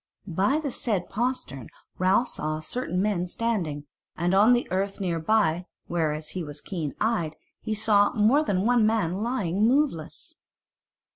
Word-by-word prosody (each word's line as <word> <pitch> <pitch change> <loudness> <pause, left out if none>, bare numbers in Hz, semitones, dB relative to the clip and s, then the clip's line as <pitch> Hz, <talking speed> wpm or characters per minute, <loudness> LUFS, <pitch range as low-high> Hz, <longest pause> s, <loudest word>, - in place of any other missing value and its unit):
By 200 - +1
the 300 -3 -3
said 205 -7 -2
postern 235 - -3 0.3
Ralph 190 +7 +3
saw 155 0 -3
certain 180 +2 -2
men 190 -4 0
standing; 175 -9 -2 0.3
and 175 +2 0
on 210 +5 +6
the 245 - +1
earth 195 +1 -1
near 175 -4 -1
by, 180 -1 +1 0.2
whereas 155 -2 -1
he 185 - -4
was 150 -1 -6
keen 160 -4 -5
eyed, 210 -9 0 0.2
he 220 - -3
saw 205 -1 +4
more 240 +7 +4
than 195 -7 0
one 240 -1 +4
man 205 -4 0
lying 210 -5 -1
moveless. 260 - -1
195 Hz, 150 wpm, -26 LUFS, 165-225 Hz, 0.3 s, on